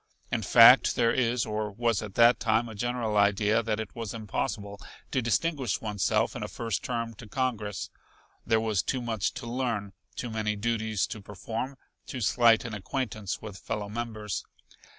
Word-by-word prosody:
In - - 0
fact - - +7
there 115 -1 +3
is, 120 -2 +1
or 105 -1 -2
was 115 0 0
at 105 -3 -8
that 120 +1 +6
time 115 0 +2
a 110 - -8
general 115 0 -1
idea 105 +2 +3
that 110 -1 -2
it 110 -2 -5
was 115 -2 -5
impossible 100 -1 -4 0.3
to 130 - +1
distinguish 125 - 0
oneself 105 -3 0
in - - -5
a - - -3
first 115 -3 -3
term 115 -2 -3
to 115 +1 -12
Congress. 105 -4 -2 0.5
There 110 - +2
was 110 -4 +1
too 130 -2 -2
much 110 -4 -1
to - - -6
learn, 115 -5 -2 0.2
too 120 - -4
many 110 -1 -1
duties 110 -1 0
to 110 -6 -7
perform, 110 +8 -5 0.3
too 130 - -5
slight 115 +1 +4
an 115 - -5
acquaintance 105 -1 -4
with 105 -3 -8
fellow 105 0 -4
members. 110 -3 -4
110 Hz, 170 wpm, -28 LUFS, 105-120 Hz, 0.5 s, fact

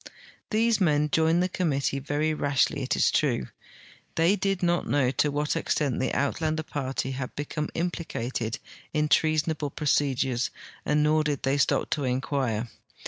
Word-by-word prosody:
These 225 0 +2
men 150 -3 +2
joined 165 +2 +3
the - - +1
com 180 -2 -1
mittee 140 -1 -1
very 150 +2 0
rashly, 145 -1 +1
it 130 - 0
is - - +3
true. 125 - +1 0.7
They 170 +5 +4
did 195 -2 -1
not 175 0 +1
know 135 -3 +2
to 145 +3 +1
what 145 +1 -1
ex - - 0
tent 140 -5 0
the 130 - 0
Uitlander 155 +2 -1
party 135 -3 -3
had 130 -1 -5
become 150 +1 -3
implicated 130 -9 -3 0.4
in 150 -1 +1
treasonal)le 155 -1 +1
procedures, 135 -4 +1 0.4
nor 150 +1 +3
did 145 -3 -2
they 135 +1 +1
stop - - +1
to 145 - 0
inquire. 125 -3 -1
150 Hz, 155 wpm, -27 LUFS, 135-160 Hz, 0.7 s, They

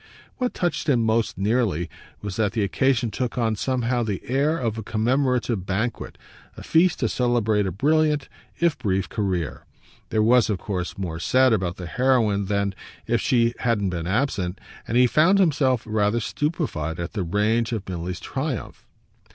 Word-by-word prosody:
What 250 -1 -2
touched 170 -4 -1
him 120 -5 +3
most 110 -1 +1
nearly 100 -5 +1 0.4
was 100 -2 -4
that 110 -2 +1
the 110 -3 0
occasion 125 +2 +1
took 125 0 -3
on 115 -2 +1
somehow 125 +1 0
the 105 -5 -3
air 140 +5 +1
of 115 -5 -2
a - - -5
commemorative 120 -2 0
banquet, 110 +5 -2 0.4
a - - -8
feast 170 +1 +3
to - - +2
celebrate 115 -5 +1
a - - -2
brilliant 150 - +2 0.3
if 170 -5 +2
brief 95 -5 -1
career. 95 -7 -2 0.5
There 110 - +2
was 120 +1 +4
of 105 - 0
course 90 -1 -4
more 85 -4 -4
said 130 +6 +3
about 90 -4 -1
the 90 - -6
heroine 110 -1 +2
than 100 0 0 0.3
if 115 0 +1
she 120 -4 +2
hadn't 105 -6 0
been 85 -1 -4
absent, 95 -4 -1 0.3
and 115 - 0
he 125 - +6
found 160 +10 +4
himself 140 - +2
rather 110 +1 +1
stupefied 115 - -2
at 85 +1 -4
the 105 - -2
range 105 +6 +1
of 110 -4 -4
Milly's 90 0 -4
triumph. 135 -3 -5
115 Hz, 165 wpm, -24 LUFS, 100-130 Hz, 0.5 s, he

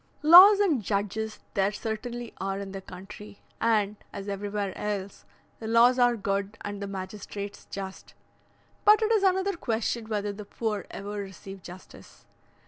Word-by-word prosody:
Laws 370 +6 +10
and 335 - +2
judges 210 +2 -2 0.2
there 195 -1 +2
certainly 230 +3 -5
are 195 0 -2
in 200 -1 -6
the 195 0 -6
country, 195 +2 -11 0.2
and, 215 -2 +2
as 200 0 -7
everywhere 200 -1 -3
else, 200 -2 -4 0.3
the 220 - -6
laws 235 +3 +5
are 245 -1 +4
good 200 +1 -2
and 205 0 -6
the 200 - -3
magistrates 200 +1 -7
just; 195 -1 -8 0.7
but 430 +1 +6
it 435 - +1
is 440 -3 +4
another 380 0 +2
question 230 -5 -2
whether 205 -1 -2
the 210 +1 -8
poor 210 0 -3
ever 200 +1 -7
receive 195 0 -9
justice. 180 +2 -13
205 Hz, 150 wpm, -27 LUFS, 195-235 Hz, 0.7 s, Laws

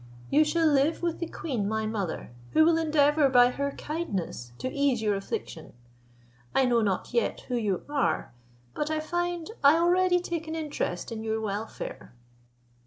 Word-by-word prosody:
You 300 +2 +6
shall 325 +2 +1
live 300 +2 +2
with 340 -1 -1
the 335 - -2
queen 240 -14 -3
my 220 0 -1
mother, 205 - -3 0.2
who 315 - +6
will 335 0 +5
endeavour 295 -2 +3
by 245 -1 +6
her 280 +2 -2
kindness 195 - -4
to - - -3
ease 280 -4 +2
your 210 -1 +2
affliction. 195 -4 -5 0.8
I 265 - +4
know 240 -2 +3
not 200 +2 -1
yet 235 - 0
who 250 - -4
you 210 -6 -1
are; 290 - -1 0.4
but 300 - -2
I 310 0 0
find 345 +3 -2
I 285 +3 +7
already 355 +1 +3
take 340 -2 -4
an 320 - -4
interest 295 - -3
in 220 -1 -5
your 220 0 -1
welfare." 210 - -5
280 Hz, 170 wpm, -28 LUFS, 220-320 Hz, 0.8 s, I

